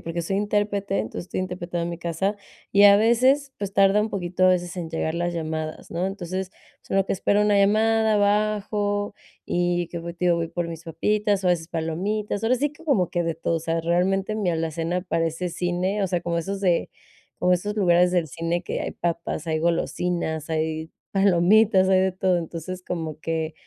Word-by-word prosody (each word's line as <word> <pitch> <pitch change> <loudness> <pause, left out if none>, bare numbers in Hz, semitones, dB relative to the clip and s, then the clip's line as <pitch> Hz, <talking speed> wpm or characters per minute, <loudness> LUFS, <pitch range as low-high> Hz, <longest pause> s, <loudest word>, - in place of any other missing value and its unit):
porque 170 +1 -4
soy 195 +4 -2
intérprete, 205 - 0
entonces 110 +10 -4
estoy - - -4
interpretado 175 -2 -3
en 170 - -3
mi 170 - -6
casa, 175 +5 -1 0.4
y 200 - +5
a 200 0 +9
veces, 260 +6 +3
pues, 200 -1 -4
tarda 195 +1 +5
un 215 +1 -1
poquito 185 -1 -1
a - - +6
veces 175 -1 -1
en 165 -2 -5
llegar 160 0 -2
las 175 0 -1
llamadas, 155 -1 -4
¿no? 175 +3 -1
Entonces, 190 -1 -4 0.3
pues - - -25
en - - +1
lo 195 - +2
que - - 0
espero 205 +2 +2
una 210 -1 +3
llamada, 220 +2 +3
bajo 205 0 0 0.3
y 175 0 0
qué, 170 - -4
pues, 170 +1 -7
te 180 - -3
digo, 175 -1 +4
voy 165 -1 -2
por 175 0 -3
mis 165 -1 -7
papitas 205 +4 0
o 180 - +3
a - - +5
veces 165 -1 -1
palomitas, 190 +6 -2
ahora 250 +3 +3
sí 290 +3 -1
que 315 - -17
como 210 - +2
que 175 - 0
de 165 -1 -1
todo, 165 0 -1
o - - -3
sea, 165 0 -1
realmente 190 +5 +1
mi 200 -5 0
alacena 165 +2 -2
parece 165 0 -1
cine, 180 +4 -1
o - - -2
sea, 175 -1 0
como 170 -1 -1
esos 195 +3 -3
de 180 -3 +1 0.5
como 180 0 +3
esos 205 +4 -3
lugares 180 -3 +4
del 175 -3 +1
cine 165 +4 -2
que - - -3
hay - - -3
papas, 170 -1 -3
hay 160 -1 0
golosinas, 170 -1 -1
hay 160 0 -2 0.2
palomitas, 195 +1 +4
hay 190 -1 +4
de 190 -1 +1
todo. 185 -1 +1
Entonces, 170 +2 -6
como 160 -3 -4
que 160 -1 -2
180 Hz, 210 wpm, -24 LUFS, 170-200 Hz, 0.5 s, a